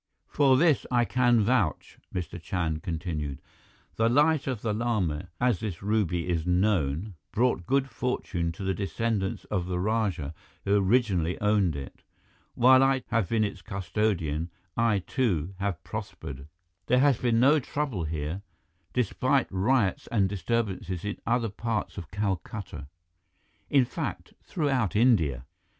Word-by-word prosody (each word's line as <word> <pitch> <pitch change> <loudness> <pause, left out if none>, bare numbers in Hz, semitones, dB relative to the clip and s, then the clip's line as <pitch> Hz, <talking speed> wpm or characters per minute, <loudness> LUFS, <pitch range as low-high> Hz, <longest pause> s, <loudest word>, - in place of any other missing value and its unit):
"For 135 -3 +3
this 150 -7 +3
I 120 -1 +3
can 120 -1 +3
vouch," 105 -6 0
Mr. 90 -1 -5
Chand 80 -3 -2
continued. 80 -5 -4 0.6
"The 115 +1 +3
Light 150 +3 +3
of 125 -5 -3
the 110 -2 0
Lama, 100 -8 -1
as 125 -6 +2
this 100 -5 -5
ruby 95 -5 0
is 85 -3 0
known, 90 -1 +1 0.2
brought 115 -7 +1
good 135 0 +2
fortune 90 -11 -2
to 95 - -8
the 95 0 0
descendants 100 +1 -2
of 90 -4 -1
the 90 -1 -1
rajah 95 -7 -1 0.3
who 100 +1 +3
originally 95 -4 +2
owned 105 -6 +2
it. 70 -1 -8 0.5
While 130 +2 +6
I 135 -1 +3
have 115 -5 +1
been 115 -2 +2
its 100 -3 -3
custodian, 90 -4 -1 0.3
I, 110 -5 +2
too, 95 - 0
have 100 -5 -2
prospered. 70 +1 -7 0.4
There 125 - +4
has 135 -2 +4
been 115 -2 +2
no 140 +5 +5
trouble 130 - -3
here, 80 +4 -3 0.5
despite 130 +3 +1
riots 100 +1 +1
and 100 -5 +2
disturbances 95 -2 -2
in 105 - -3
other 115 -1 +1
parts 110 -1 -3
of 85 -4 -9
Calcutta, 95 -6 -4 0.8
in 135 -3 +4
fact, - - -5
throughout 135 - 0
India." 80 - +3
105 Hz, 140 wpm, -28 LUFS, 90-120 Hz, 0.8 s, While